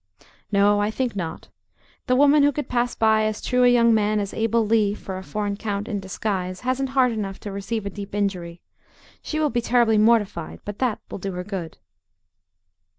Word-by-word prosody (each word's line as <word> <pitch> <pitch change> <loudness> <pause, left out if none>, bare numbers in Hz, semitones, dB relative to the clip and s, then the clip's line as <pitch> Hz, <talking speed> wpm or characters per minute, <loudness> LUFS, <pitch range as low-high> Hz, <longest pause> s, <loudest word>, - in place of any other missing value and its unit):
"No, 205 0 +4
I 205 - +1
think 240 0 -2
not. 170 -4 -5 0.6
The 255 - +3
woman 290 +2 +5
who 290 +1 +4
could 295 +1 -4
pass 245 0 0
by 220 -1 +3
as 215 0 -2
true 250 0 +1
a - - +6
young 235 -1 +5
man 215 -1 +2
as 200 -1 -3
Abel 225 0 +1
Lee 210 -2 +2
for 190 -3 -6
a - - -9
foreign 205 0 -3
count 205 0 -3
in 210 -4 -2
disguise, 190 -1 -3
hasn't 260 +1 -1
heart 250 -2 +5
enough 200 -3 -4
to 205 - -6
receive 200 +2 -4
a 200 - -3
deep 200 0 -7
injury. 180 -4 -2 0.6
She 310 - -3
will 300 -2 +1
be 240 - 0
terribly 235 -2 +3
mortified, 210 -6 +1
but 205 0 -6
that 250 -5 0
will - - -5
do 195 +1 -4
her 180 0 -4
good." 180 -5 -6
215 Hz, 200 wpm, -23 LUFS, 200-240 Hz, 0.6 s, a